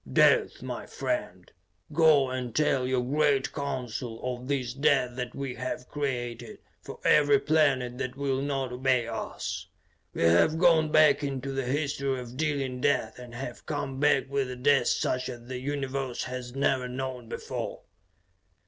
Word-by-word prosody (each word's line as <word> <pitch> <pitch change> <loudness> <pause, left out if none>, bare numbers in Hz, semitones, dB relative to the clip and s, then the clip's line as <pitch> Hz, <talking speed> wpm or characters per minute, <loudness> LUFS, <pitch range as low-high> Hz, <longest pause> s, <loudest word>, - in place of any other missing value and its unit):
"Death, - - +4
my - - -5
friend. 90 0 -4 0.4
Go 150 -4 +5
and 125 -3 -4
tell 135 -4 +2
your 130 -1 +1
great 140 +1 +1
Council 125 -4 -4
of 125 0 -4
this 130 -4 -1
death 135 -2 +2
that 125 -1 -5
we 135 -2 -4
have 125 0 -5
created 120 -5 -3 0.2
for - - -9
every 145 -1 +6
planet 135 -5 +2
that 130 -1 -3
will 135 -1 0
not 135 -2 -2
obey 125 -1 +2
us. 115 -1 -5 0.5
"We - - 0
have 85 - +4
gone 160 -3 +4
back 155 -1 +5
into 135 -1 -3
the 135 -1 -2
history 140 -1 -1
of 125 0 -8
dealing 140 -4 -1
death 125 -5 +1
and 120 -1 -10
have 120 -1 -7
come 135 -3 -3
back 140 -2 +3
with 135 -1 -1
a 125 - -5
death 140 +2 +3
such 130 0 0
as 120 -2 -8
the 130 0 -4
Universe 135 -2 -3
has 125 0 -6
never 135 -2 +1
known 125 -2 -5
before! - - -5
130 Hz, 155 wpm, -28 LUFS, 125-140 Hz, 0.5 s, every